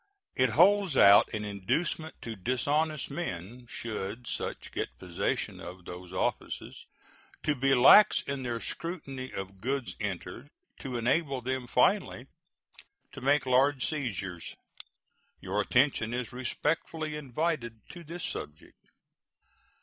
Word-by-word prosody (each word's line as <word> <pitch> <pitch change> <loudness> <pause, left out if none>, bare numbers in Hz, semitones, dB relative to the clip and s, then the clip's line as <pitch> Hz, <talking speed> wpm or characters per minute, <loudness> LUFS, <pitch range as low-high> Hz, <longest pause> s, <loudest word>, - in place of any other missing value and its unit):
It 130 -1 +3
holds 185 - +4
out 100 +1 +7
an 105 0 -3
inducement 150 - -2
to 115 -1 -5
dishonest 140 - 0
men, 120 - -5
should 110 +1 -5
such - - -4
get - - -4
possession 90 -2 -2
of 90 0 -9
those 90 0 -9
offices, 95 - -3 0.6
to 150 - +2
be 135 0 +3
lax 135 +12 +7
in 140 -1 -3
their 120 -2 -2
scrutiny 140 -4 -5
of 95 0 -7
goods 135 +1 -2
entered, 105 +5 -5 0.3
to 130 -3 -4
enable 135 +3 +1
them 130 0 -2
finally - - +2 0.9
to 135 - -10
make 140 +2 +3
large 130 +1 +3
seizures. 100 - -4 0.8
Your 100 +3 -1
attention 120 -1 +2
is 125 0 -4
respectfully 150 +4 -2
invited 140 -4 -2
to 175 0 -10
this 170 +2 -7
subject. 75 +1 -7
130 Hz, 120 wpm, -29 LUFS, 105-150 Hz, 0.9 s, out